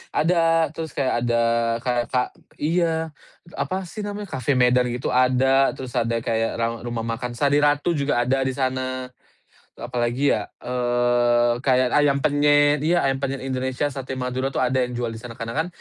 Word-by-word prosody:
ada, 165 -1 +2
terus 160 -1 -7
kayak 130 -2 0
ada, 120 -1 +2 0.4
kayak 120 -2 0
ka 125 - +2 0.4
iya, 160 0 0 0.5
apa 190 +1 -2
sih 185 +4 -10
namanya, 205 0 -5
kafe 130 +2 0
Medan, 125 0 +3
gitu, 125 +1 -3
ada. 130 +2 +3
Terus 130 -2 -7
ada 115 0 0
kayak 115 -1 0
raum 115 0 -1
rumah 115 -1 -3
makan 120 +1 -4
Sari 145 +3 +2
Ratu 145 +3 +2
juga 140 -5 +1
ada 130 +2 +1
di 130 - -1
sana. 130 -1 -2 0.6
Apalagi 120 +3 -1
ya, 105 - -5 0.2
eee, 120 -1 +1
kayak 130 -2 +3
ayam 140 -1 +3
penyet. 145 +1 +4
Iya, 175 +2 +3
ayam 135 - 0
penyet 135 0 -3
Indonesia, 130 +1 -2
sate 135 -1 -6
Madura, 130 +1 -3
itu - - 0
ada 130 +1 +1
yang 125 - -7
jual 120 -1 -2
di 115 - -7
sana. 115 +1 -9
Karena 115 +1 -6
kan 160 +2 0
130 Hz, 175 wpm, -23 LUFS, 120-145 Hz, 0.6 s, penyet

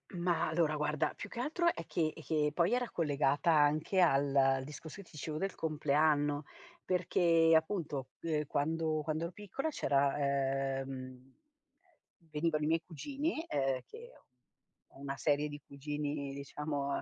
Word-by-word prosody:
Mah, 175 -1 +1
allora 160 -1 +2
guarda 150 0 0
più - - -7
che 235 - -7
altro 330 +7 0
è 165 - -7
che 155 -1 0
è 160 - -11
che, 150 -1 +1
poi 175 +7 +2
era 245 -1 0
collegata 145 0 +2
anche 155 +5 +3
al 135 -4 +4
discorso 150 +3 -9
che 200 - -8
ti - - -20
dicevo 155 0 -4
del 195 +3 -2
compleanno. 150 -1 +2 0.4
Perché 170 -2 +3
appunto, 160 -5 0
uhm, 155 -2 0
quando 155 +2 0
quando 155 +1 -2
ero 170 - -3
piccola 210 - -4
c'era, 140 - +1 0.6
ehm 130 -1 -8 1.1
venivano 155 -1 +1
i - - +1
miei 165 +1 +2
cugini, 285 - -3
uhm, 135 -2 +1
che 475 +2 -12
ho - - -26 0.7
ho - - -16
una 140 0 -4
serie 145 +1 +1
di 145 0 -8
cugini 145 0 -4
diciamo 140 0 -3
155 Hz, 150 wpm, -33 LUFS, 145-170 Hz, 1.1 s, al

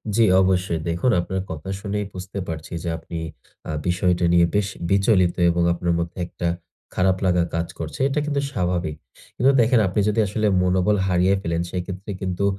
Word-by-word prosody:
জ্বি 115 - +5 0.2
অবশ্যই। 90 -3 +1
দেখুন 85 +9 +1
আপনার 95 +2 -2
কথা 80 +3 -6
শুনেই 105 0 -3
বুঝতে 95 +2 -6
পারছি 80 0 -6
যে 85 - -2
আপনি 80 +1 -7 0.5
আ - - -1 0.2
বিষয়টা 90 0 +1
নিয়ে 85 0 +6
বেশ 105 -1 +2 0.2
বিচলিত 95 -3 +3 0.2
এবং 85 0 +1
আপনার 85 0 -1
মধ্যে 85 +2 -4
একটা 85 - -4 0.5
খারাপ 95 0 +2
লাগা 90 -2 +3
কাজ 85 0 -1
করছে। 80 -3 -6
এটা 140 +2 0
কিন্তু 145 -2 0
স্বাভাবিক। 90 - -1 0.4
কিন্তু 130 +3 +4
দেখেন 120 +1 +4
আপনি 95 +3 -1
যদি 105 - 0
আসলে 105 +2 0 0.2
মনোবল 90 +3 +2
হারিয়ে 90 +1 +3
ফেলেন 85 -2 -1
সেক্ষেত্রে 95 +2 -5
কিন্তু 95 +1 -1
90 Hz, 170 wpm, -23 LUFS, 85-100 Hz, 0.5 s, নিয়ে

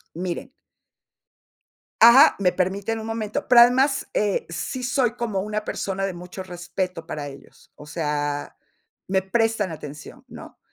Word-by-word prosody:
Miren 180 - -4 1.5
Ajá, 235 +4 +8
¿me 185 -2 +3
permiten 200 +5 -2
un 220 - -7
momento? 220 -2 -3
Pero 240 -1 +8
además, 265 +3 +4
eh, 205 -2 0
sí 175 +10 -4
soy 245 -1 +1
como 225 -5 -2
una 215 +1 -3
persona 195 -2 -3
de 195 - -3
mucho 180 +2 -8
respeto 175 -1 -5
para 150 -4 -5
ellos. 140 -1 -15
O 150 - -13
sea, 145 -1 -3 0.5
me 190 0 +1
prestan 220 0 0
atención, 150 -1 -10
¿no? - - -12
195 Hz, 140 wpm, -23 LUFS, 175-225 Hz, 1.5 s, Ajá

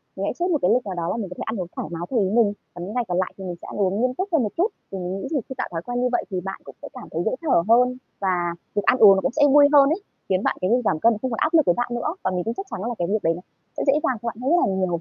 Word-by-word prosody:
Mình - - -3
hãy - - -1
xếp 350 - +1
một 310 - +3
cái 180 - +3
lịch 250 -2 +1
nào 190 -2 -4
đó 170 -1 -2
là - - -2
mình 200 -5 -4
có 180 - -8
thể - - -4
ăn 225 - -3
uống 175 - -5
thoải - - -4
mái 165 0 -5
theo 245 - +2
ý 190 -2 +1
mình, 215 -2 +3 0.2
còn 175 - -7
những 205 - -7
ngày 245 0 0
còn 180 0 -1
lại 185 - -1
thì 195 - -8
mình 180 -2 -4
sẽ - - -10
ăn - - -7
uống 195 +3 +1
nghiêm 255 0 +1
túc 375 +8 -3
hơn 320 -7 +3
một 215 - -1
chút. 370 +5 +3 0.2
Thì 195 - -4
mình 185 +1 -4
nghĩ - - -5
thì 310 - +1
khi 265 - -6
tạo - - -2
thói 165 -1 -3
quen 245 0 -2
như 250 - +2
vậy 240 - +1
thì 185 -2 -3
bạn 195 - -5
cũng - - -12
sẽ - - -7
cảm - - -10
thấy - - -2
dễ - - +1
thở 265 - +2
hơn, 250 +2 +4 0.2
và 195 -1 0 0.5
việc 205 - +1
ăn 255 - +4
uống 200 -4 +8
nó 190 - 0
cũng - - 0
sẽ 290 +4 -1
vui 290 -1 +8
hơn 280 -1 +7
ấy, 345 +6 -1 0.3
khiến 185 0 +1
bạn - - 0
cái 185 - +1
việc 245 +1 +3
giảm 155 - +1
cân 230 +7 +4
nó - - -4
không 260 - -2
còn 225 - -2
áp 315 +2 +1
lực 315 -3 +5
với 175 - +3
bạn 245 - -1
nữa. 275 +8 -2
Và 185 - 0
mình 180 -1 -1
tin 230 - -2
chắc 390 - -6
chắn - - -4
là 235 +3 -3
cái 175 - 0
việc 210 +2 -1
đấy 165 - +3
nó 175 - -8 0.4
sẽ - - -1
dễ 275 - +6
dàng 255 - +1
cho 235 - -5
bạn 230 - -4
hơn 270 +5 0
rất 350 - +5
là 195 - +1
nhiều. 185 -1 0
225 Hz, 385 wpm, -23 LUFS, 185-255 Hz, 0.5 s, uống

